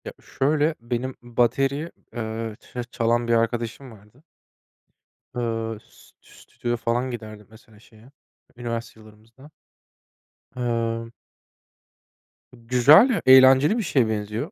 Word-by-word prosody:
Ya, -, -, -7 dB
şöyle, 150 Hz, +3 st, 0 dB
benim 120 Hz, +2 st, -4 dB
bateri, 135 Hz, +6 st, 0 dB, 0.2 s
eee, 110 Hz, -1 st, -5 dB
ça 125 Hz, -, -7 dB
çalan 120 Hz, +1 st, 0 dB
bir 120 Hz, -, +2 dB
arkadaşım 115 Hz, +2 st, -2 dB
vardı. 105 Hz, +6 st, -19 dB, 1.1 s
Iıı, 115 Hz, -2 st, -3 dB
st -, -, -23 dB
stüdyoya 120 Hz, 0 st, -6 dB
falan 120 Hz, +3 st, -1 dB
giderdi, 110 Hz, -3 st, -9 dB
mesela, 110 Hz, -1 st, -19 dB
şeye 110 Hz, +3 st, -20 dB, 0.5 s
üniversite 115 Hz, -1 st, -6 dB
yıllarımızda. 110 Hz, +6 st, -18 dB, 1.0 s
Emm 115 Hz, -2 st, -2 dB, 1.4 s
Güzel, 125 Hz, -, +5 dB
eğlenceli 130 Hz, -, +6 dB
bir 230 Hz, -, -1 dB
şeye 130 Hz, -, +1 dB
benziyor. 110 Hz, -, -4 dB
120 Hz, 105 wpm, -23 LUFS, 115-130 Hz, 1.4 s, eğlenceli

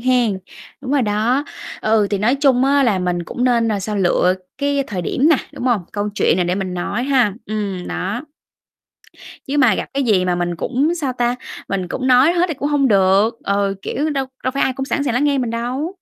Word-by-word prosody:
hén. 245 Hz, -5 st, +2 dB, 0.4 s
Đúng 260 Hz, -1 st, -6 dB
rồi 285 Hz, -2 st, +3 dB
đó. 225 Hz, +6 st, +1 dB, 0.4 s
Ừ, 215 Hz, -1 st, +2 dB
thì 200 Hz, -, 0 dB
nói 225 Hz, +6 st, +2 dB
chung 265 Hz, -3 st, +4 dB
á 280 Hz, 0 st, +3 dB
là 220 Hz, -7 st, +2 dB
mình 180 Hz, -1 st, -1 dB
cũng 245 Hz, -, -3 dB
nên 235 Hz, -2 st, +2 dB
là 210 Hz, -2 st, -1 dB
sao? 210 Hz, +2 st, -3 dB
Lựa 180 Hz, -1 st, +2 dB, 0.2 s
cái 280 Hz, 0 st, +1 dB
thời 185 Hz, -4 st, -4 dB
điểm 275 Hz, -, +1 dB
nè, 320 Hz, -, +5 dB, 0.2 s
đúng -, -, -7 dB
hông? 240 Hz, -7 st, +2 dB
Câu 205 Hz, 0 st, -2 dB
chuyện -, -, +2 dB
nè 180 Hz, -, +1 dB
để 175 Hz, +1 st, 0 dB
mình 190 Hz, -2 st, -3 dB
nói 200 Hz, +7 st, -2 dB
ha. 255 Hz, -7 st, +2 dB
Ừm, 200 Hz, -4 st, -3 dB
đó. 200 Hz, +7 st, -3 dB, 1.3 s
Chứ 280 Hz, +2 st, -1 dB
mà 250 Hz, -8 st, +4 dB
gặp -, -, -3 dB
cái 275 Hz, 0 st, 0 dB
gì 200 Hz, -6 st, +2 dB
mà 180 Hz, -1 st, +1 dB
mình 175 Hz, 0 st, -2 dB
cũng, 275 Hz, -, 0 dB
sao 280 Hz, -6 st, -2 dB
ta, 245 Hz, 0 st, 0 dB, 0.3 s
mình 190 Hz, -2 st, -2 dB
cũng 255 Hz, +8 st, -3 dB
nói 260 Hz, +6 st, +5 dB
hết 350 Hz, 0 st, +2 dB
thì -, -, -1 dB
cũng 285 Hz, +1 st, -3 dB
hông 285 Hz, -2 st, +2 dB
được. 200 Hz, +2 st, +3 dB
Ờ, 200 Hz, 0 st, 0 dB
kiểu, 300 Hz, +9 st, -2 dB
đâu 275 Hz, -3 st, -1 dB, 0.2 s
đâu 255 Hz, -, 0 dB
phải 275 Hz, -, 0 dB
ai 260 Hz, -, +1 dB
cũng 270 Hz, +1 st, -4 dB
sẵn 280 Hz, -, -1 dB
sàng 255 Hz, -5 st, -1 dB
lắng 250 Hz, +4 st, +1 dB
nghe 285 Hz, -1 st, +2 dB
mình 250 Hz, -3 st, -1 dB
đâu. 250 Hz, +9 st, -3 dB
240 Hz, 230 wpm, -19 LUFS, 200-270 Hz, 1.3 s, nè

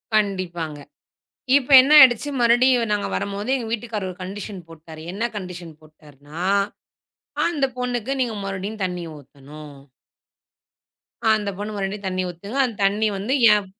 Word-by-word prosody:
கண்டிப்பாங்க. 175 Hz, -7 st, -1 dB, 0.8 s
இப்ப 285 Hz, 0 st, 0 dB
என்ன 285 Hz, +3 st, +1 dB
ஆயிடுச்சு? 265 Hz, +1 st, +6 dB
மறுடியும் 240 Hz, -1 st, +3 dB
நாங்க 205 Hz, -1 st, -1 dB
வரும்போது 200 Hz, +4 st, -4 dB
எங்க 235 Hz, -3 st, -5 dB
வீட்டுக்காரரு 220 Hz, -4 st, -3 dB
ஒரு 180 Hz, -, -12 dB
கண்டிஷ்ன் 195 Hz, +1 st, -7 dB
போட்டாரு. 160 Hz, -1 st, -12 dB
என்ன 205 Hz, -, -5 dB
கண்டிஷ்ன் 180 Hz, -4 st, -8 dB
போட்டாருனா? 150 Hz, +1 st, -12 dB, 1.1 s
அந்த 300 Hz, -5 st, 0 dB
பொண்ணுக்கு 250 Hz, 0 st, -3 dB
நீங்க 235 Hz, -4 st, -1 dB
மறுபடியும் 195 Hz, +2 st, -5 dB
தண்ணி 180 Hz, -1 st, -4 dB
ஊத்தணும். 145 Hz, +1 st, -13 dB, 1.5 s
அந்த 215 Hz, -2 st, +2 dB
பொண்ணு 205 Hz, +1 st, -5 dB
மறுபடியும் 200 Hz, 0 st, -4 dB
தண்ணி 185 Hz, 0 st, -2 dB
ஊத்துங்க. 200 Hz, +8 st, -7 dB
அந்தத் 225 Hz, -5 st, -6 dB
தண்ணி 205 Hz, +3 st, +2 dB
வந்து 210 Hz, +7 st, -2 dB, 0.2 s
ஏன் 205 Hz, -1 st, +1 dB
200 Hz, 130 wpm, -22 LUFS, 175-225 Hz, 1.5 s, ஆயிடுச்சு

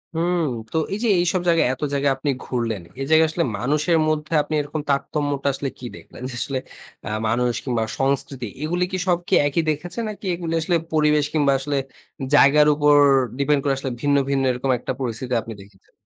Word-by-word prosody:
হুম। 175 Hz, +2 st, +1 dB, 0.3 s
তো -, -, -1 dB, 0.2 s
এই -, -, -1 dB
যে, -, -, +2 dB
এইসব 180 Hz, +1 st, +1 dB
জায়গায় 165 Hz, -5 st, +3 dB
এত 130 Hz, -, -10 dB
জায়গায় 140 Hz, 0 st, +2 dB
আপনি 145 Hz, +2 st, -2 dB
ঘুরলেন। 115 Hz, -5 st, -2 dB, 0.2 s
এই -, -, -1 dB
জায়গায় 160 Hz, 0 st, +5 dB
আসলে 165 Hz, +2 st, -1 dB
মানুষের 150 Hz, -, +1 dB
মধ্যে 155 Hz, +1 st, -2 dB
আপনি 155 Hz, -, -6 dB
এরকম 150 Hz, +1 st, -4 dB
তারতম্যটা 140 Hz, 0 st, -1 dB
আসলে 135 Hz, +1 st, -3 dB
কি 125 Hz, -, -8 dB
দেখলেন? -, -, -14 dB
যে, -, -, -7 dB
আসলে 135 Hz, -2 st, -2 dB, 0.5 s
আ -, -, -3 dB, 0.2 s
মানুষ 120 Hz, +2 st, +1 dB
কিংবা 120 Hz, -4 st, -1 dB, 0.2 s
সংস্কৃতি 135 Hz, -1 st, -1 dB, 0.2 s
এগুলো 175 Hz, +3 st, 0 dB
কি 185 Hz, -, -1 dB
সব 175 Hz, -1 st, +3 dB, 0.3 s
একই 145 Hz, +4 st, 0 dB
দেখেছেন? 175 Hz, +9 st, -3 dB
নাকি 210 Hz, -1 st, -9 dB
এগুলো 170 Hz, -1 st, -4 dB
আসলে 170 Hz, +2 st, +1 dB, 0.2 s
পরিবেশ 150 Hz, -1 st, +3 dB
কিংবা 145 Hz, -3 st, +3 dB
আসলে 145 Hz, +1 st, -2 dB, 0.6 s
জায়গার 150 Hz, +1 st, +6 dB
উপর 145 Hz, 0 st, +4 dB, 0.5 s
ডিপেন্ড 140 Hz, +1 st, +2 dB
করে 140 Hz, -, +1 dB
আসলে 135 Hz, -1 st, -4 dB
ভিন্ন, 145 Hz, 0 st, +2 dB
ভিন্ন, 135 Hz, -1 st, +1 dB
এরকম 125 Hz, +2 st, -1 dB
একটা -, -, -4 dB
পরিস্থিতি 125 Hz, 0 st, -3 dB
আপনি 115 Hz, -, -8 dB
দেখেছেন? 100 Hz, -1 st, -20 dB
145 Hz, 185 wpm, -22 LUFS, 135-160 Hz, 0.6 s, জায়গার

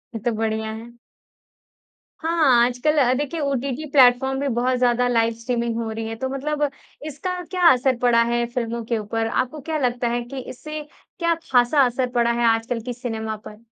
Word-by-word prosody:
ये 225 Hz, -, -3 dB
तो 240 Hz, -, +2 dB
बढ़िया 220 Hz, 0 st, -1 dB
है। 230 Hz, +2 st, -9 dB, 1.3 s
हाँ, 310 Hz, -8 st, +4 dB
आजकल 250 Hz, +5 st, 0 dB
अ, 255 Hz, -3 st, +4 dB
देखिए, 290 Hz, +4 st, -2 dB
ओटीटी 280 Hz, +1 st, -2 dB
प्लेटफ़ॉर्म 265 Hz, 0 st, +4 dB
में 280 Hz, -4 st, -1 dB
बहुत 250 Hz, +2 st, +1 dB
ज़्यादा 245 Hz, 0 st, +2 dB
लाइव-स्ट्रीमिंग 230 Hz, 0 st, 0 dB
हो 230 Hz, -1 st, -3 dB
रही 225 Hz, 0 st, -4 dB
है। 225 Hz, -, -4 dB
तो 260 Hz, +4 st, -3 dB
मतलब 295 Hz, +2 st, -1 dB, 0.4 s
इसका 360 Hz, +5 st, -4 dB
क्या 360 Hz, -2 st, +4 dB
असर 260 Hz, 0 st, +2 dB
पड़ा 235 Hz, -1 st, +4 dB
है 240 Hz, 0 st, +1 dB
फ़िल्मों 235 Hz, -1 st, -2 dB
के 235 Hz, -1 st, -1 dB
ऊपर? 225 Hz, +1 st, -2 dB
आपको 255 Hz, +6 st, -2 dB
क्या 315 Hz, +3 st, -3 dB
लगता 245 Hz, -3 st, 0 dB
है 240 Hz, 0 st, -1 dB
कि 265 Hz, +3 st, -7 dB
इससे 305 Hz, +4 st, -7 dB, 0.4 s
क्या 335 Hz, -1 st, +2 dB, 0.2 s
खासा 250 Hz, +3 st, +4 dB
असर 250 Hz, +1 st, -1 dB
पड़ा 235 Hz, 0 st, +3 dB
है 235 Hz, 0 st, 0 dB
आज 225 Hz, 0 st, +2 dB
कल 235 Hz, -2 st, -2 dB
की 245 Hz, -, -3 dB
सिनेमा 220 Hz, -3 st, -4 dB
पर? 215 Hz, +2 st, -13 dB
245 Hz, 185 wpm, -22 LUFS, 230-275 Hz, 1.3 s, हाँ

